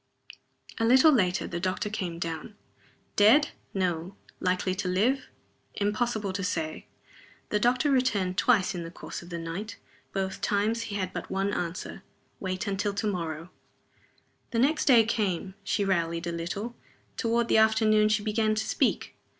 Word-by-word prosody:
A - - +1
little 260 +7 +7
later 190 -9 +2
the 170 - -4
doctor 185 +3 -1
came 185 -5 -3
down. 165 +4 -5 0.6
Dead? 250 +9 +6 0.2
No. 180 -1 -2 0.2
Likely 185 0 0
to 185 0 -3
live? 220 +9 +1 0.5
Impossible 210 -1 -1
to 195 +1 -3
say. 160 -3 -3 0.6
The 210 - +1
doctor 250 +6 +2
returned 205 -9 +1
twice 205 -3 +3
in 175 - -4
the 165 - -6
course 170 - -8
of 175 - -12
the 170 - -4
night. 170 +6 -5 0.3
Both 190 -1 -3
times 215 +3 +1
he 200 - -4
had 185 -2 -2
but - - -5
one 195 +1 -1
answer. 175 0 -4 0.4
"Wait 185 -1 -3
till 200 -2 -1
to 215 - -2
morrow." 165 -3 -3 1.0
The 235 - -3
next 285 +6 +2
day 240 -5 +7
came. 195 -4 -1
She 200 - 0
rallied 170 -3 0
a 170 - -2
little. 185 +8 -4 0.4
Toward 235 0 +1
the 220 - +4
afternoon 215 -1 +4
she 210 -1 +1
began 215 0 +1
to 220 0 -1
speak. - - 0
200 Hz, 160 wpm, -28 LUFS, 180-220 Hz, 1.0 s, little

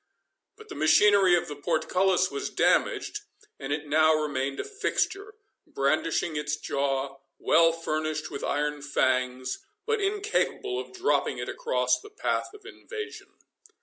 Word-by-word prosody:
But 435 0 -15
the - - -6
machinery 185 +4 +5
of 175 - -1
the 145 - -6
portcullis 180 +4 +1
was 140 - -3
damaged, - - +1 0.4
and 135 - -5
it 145 +1 -2
now 155 +2 +4
remained 140 -3 -2
a - - -1
fixture, 415 -1 -2 0.3
brandishing 155 +3 0
its 150 0 -1
jaw, 135 -1 -2 0.2
well 165 0 +4
furnished 155 -1 -3
with - - -6
iron 150 0 -1
fangs, 130 -2 0 0.3
but 450 -2 0
incapable 405 -1 -1
of 410 - -7
dropping 385 +3 0
it - - -4
across - - 0
the 420 - -12
path 420 - -2
of 410 -2 -16
invasion. 430 +2 -8
155 Hz, 140 wpm, -27 LUFS, -, 0.4 s, machinery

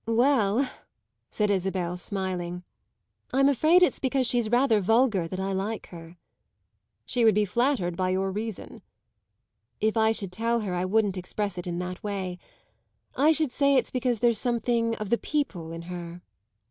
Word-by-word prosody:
"Well," 235 0 +2 0.6
said 210 -1 0
Isabel, 185 -2 -1
smiling, 180 -2 -4 0.7
"I'm 275 +1 +4
afraid 310 +6 +4
it's 360 - +2
because 265 -1 +1
she's 240 -2 +1
rather 240 -3 +3
vulgar 220 -3 +2
that 185 +2 -5
I 195 +1 -2
like 200 +3 -3
her." 165 0 -11 0.9
"She 245 - 0
would 220 -2 +5
be 210 0 +3
flattered 215 -4 0
by 185 +1 0
your 190 +1 0
reason!" 215 +1 -6 1.0
"If 220 +1 +1
I 220 0 +3
should 200 -4 -3
tell 230 +4 0
her 195 -4 -3
I 180 +1 -1
wouldn't 200 0 +1
express 185 +1 -3
it 180 - -6
in 175 -1 -3
that 180 0 -5
way. 190 -3 -4 0.8
I 295 +4 +4
should 315 -4 +1
say 280 +2 +3
it's 255 - +1
because 250 -3 -1
there's 235 -3 +3
something 235 -1 0
of 215 -2 -6
the 235 - +3
'people' 210 - -3
in 165 0 -7
her." 175 0 -8
210 Hz, 165 wpm, -26 LUFS, 185-240 Hz, 1.0 s, would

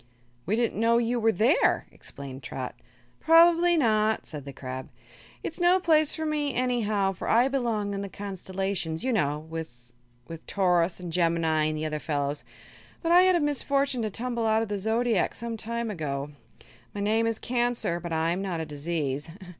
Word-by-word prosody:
"We 205 - +2
didn't 230 -2 0
know 230 +1 +4
you 235 +1 +1
were 225 0 +3
here," 225 - +3
explained 135 -1 -8
Trot. 130 -1 -5 0.5
"Probably 340 +1 +5
not," 220 -5 +2
said 150 -3 -8
the 140 - -6
crab. 130 -1 -7 0.5
"It's 325 - -4
no 355 +1 +4
place 310 -4 +3
for 315 - -3
me, 295 -2 -1
anyhow, 215 -6 +1
for 185 - -5
I 240 +3 +5
belong 230 -7 -1
in 195 - -3
the 200 - -5
Constellations, 190 -4 -4
you 260 -1 0
know, 150 -8 +1
with 150 -7 -9 0.5
Taurus 180 -3 +1
and 175 -2 -6
Gemini 165 -3 +2
and 155 0 -1
the 155 - -3
other 155 -1 -2
fellows. 145 -1 -2 0.6
But 335 - +1
I 355 +1 +8
had 370 0 +5
the 345 - +2
misfortune 280 -2 +1
to 215 - -1
tumble 235 +2 -2
out 220 +1 +3
of 225 - -6
the 205 -1 -2
Zodiac 220 0 +1
some 235 -1 -4
time 230 +1 -3
ago. 145 -5 -4 0.6
My 205 - -3
name 220 +3 +2
is 230 -1 -1
Cancer 240 -8 -1
but 170 0 -7
I'm 165 +3 0
not 185 -4 -3
a 160 - -3
disease. 150 -1 -3
205 Hz, 180 wpm, -27 LUFS, 160-245 Hz, 0.6 s, I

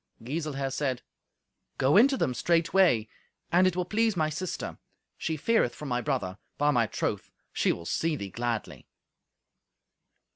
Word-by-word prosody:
Giselher 140 0 -3
said, 130 -2 -2 0.7
"Go 135 +3 +3
in 235 +6 +8
to 275 -1 -1
them 130 - 0
straightway, 165 - +3 0.4
and 180 +2 +5
it 185 - 0
will 180 -1 0
please 220 +1 +1
my 155 -1 +1
sister. 180 +4 -4 0.4
She 160 - -3
feareth 150 - +2
for 150 - -8
my 125 -3 -1
brother; 120 -9 -2 0.2
by 145 +1 +3
my 120 -5 +2
troth, - - -3 0.2
she - - +2
will 85 - -5
see 160 - 0
thee 100 -8 -6
gladly." 120 0 -3
150 Hz, 150 wpm, -28 LUFS, 125-175 Hz, 0.7 s, in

